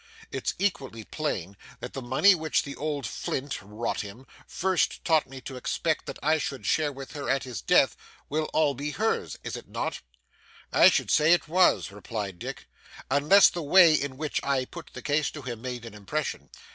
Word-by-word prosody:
'It's - - -2
equally 135 - -2
plain 100 - -4 0.2
that 125 - -7
the 135 - -5
money 130 +11 +5
which 160 -3 0
the 140 - -7
old 145 -2 -3
flint 140 -2 -4
rot 105 +4 -3
him 105 +6 -10 0.2
first 185 0 0
taught 160 -3 +3
me 135 0 -8
to 130 0 -8
expect 155 +4 -1
that - - -6
I 155 +2 +3
should 135 -7 -4
share 150 +3 +2
with 135 -1 -9
her 145 -2 -5
at 135 - +1
his 120 -9 -6
death, - - +4 0.3
will 155 +2 -1
all 155 -2 +1
be 140 +3 -4
hers, 215 +9 -1
is - - -4
it - - -9
not?' - - -3 0.7
'I - - +8
should - - 0
said 150 0 +4
it 175 0 +4
was,' 180 - +3
replied 100 -3 -5
Dick; - - -7 0.4
'unless 150 +9 +6
the 175 - -5
way 165 +2 +7
in 140 -3 -1
which 155 0 -2
I 135 -2 +1
put 165 +2 -10
the - - -9
case 150 +1 +1
to 145 - -9
him, 120 -3 -6
made 125 -2 -5
an 115 - -9
impression. 105 +9 -4
140 Hz, 195 wpm, -27 LUFS, 125-155 Hz, 0.7 s, I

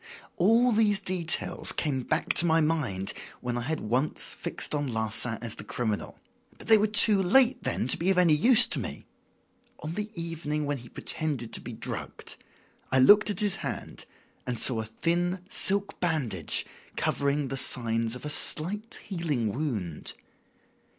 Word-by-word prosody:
"All 230 +7 +3
these 210 -2 +2
details 175 -3 -1
came 140 -4 -2
back - - -1
to 175 - +3
my 165 0 +3
mind 145 -12 -1 0.3
when 120 -1 -4
I 120 - -3
had 155 +6 -4
once 125 +7 -1
fixed - - -5
on 145 -1 -2
Larsan 110 0 -1
as 115 - -5
the - - -9
criminal. 110 0 -4 0.4
But - - -12
they 220 - +7
were 215 - +2
too 210 -1 +7
late 250 +7 +3
then - - -2
to - - +5
be 175 - -1
of 190 - +2
any 175 -3 +4
use 230 - +8
to - - -3
me. - - -7 0.8
On 155 +2 -5
the 210 +3 -5
evening 160 -3 -4
when 145 -1 -3
he 120 0 -14
pretended 140 -8 -4
to - - -3
be - - -8
drugged - - -7 0.5
I 130 - +3
looked 205 +11 +6
at 205 -2 -2
his 205 -3 +1
hand - - -7 0.4
and 125 -1 -2
saw 115 0 +5
a - - -7
thin 175 +10 -2
silk 200 +1 +2
bandage 130 - -1 0.3
covering 140 -1 -1
the 135 - -4
signs 115 -2 0
of 125 - -10
a - - -4
slight 205 +11 -1
healing 150 - -3
wound. 110 - -4
150 Hz, 170 wpm, -27 LUFS, 120-185 Hz, 0.8 s, use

